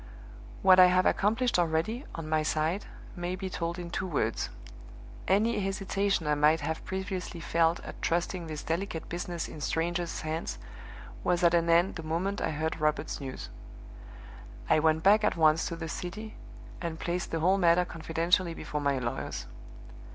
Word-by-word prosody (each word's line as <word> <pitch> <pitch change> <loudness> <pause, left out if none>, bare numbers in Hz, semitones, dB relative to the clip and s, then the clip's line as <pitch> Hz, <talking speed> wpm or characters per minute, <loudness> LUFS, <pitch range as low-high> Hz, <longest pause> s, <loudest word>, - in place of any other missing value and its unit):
"What 185 0 +7
I 180 - +10
have 185 0 +3
accomplished 225 +1 +2
already, 175 - 0
on 165 -2 -5
my 155 0 +2
side, 155 +5 -1 0.3
may 175 0 -3
be 190 0 -5
told 170 0 -3
in 175 -1 -6
two 190 - -2
words. 115 -9 -1 0.8
Any 210 +5 +3
hesitation 195 -2 0
I 150 - +2
might 150 +2 +3
have 160 +2 -3
previously 190 -2 -4
felt 165 0 +2
at - - -9
trusting 175 +1 -1
this 155 -1 -5
delicate 165 0 -3
business 175 -1 -4
in 155 - -9
strangers' 170 +3 -1
hands 160 +1 -3 0.7
was 180 0 +1
at 170 0 +5
an 170 -1 +3
end 170 +3 +3
the - - -5
moment 175 +6 -2
I - - 0
heard 160 +2 -2
Robert's 150 0 0
news. 130 -1 -6 1.2
I - - +6
went 160 0 +2
back 210 +2 +6
at 210 - +1
once 160 0 +4
to 170 - -4
the 165 -1 -5
city, 210 +7 -6 0.5
and 165 -2 -4
placed 175 +1 -2
the 165 - -2
whole 185 +4 +3
matter 175 0 +4
confidentially 165 +1 0
before 150 -2 -4
my 140 -1 +1
lawyers. 125 +1 -4
170 Hz, 165 wpm, -29 LUFS, 160-185 Hz, 1.2 s, I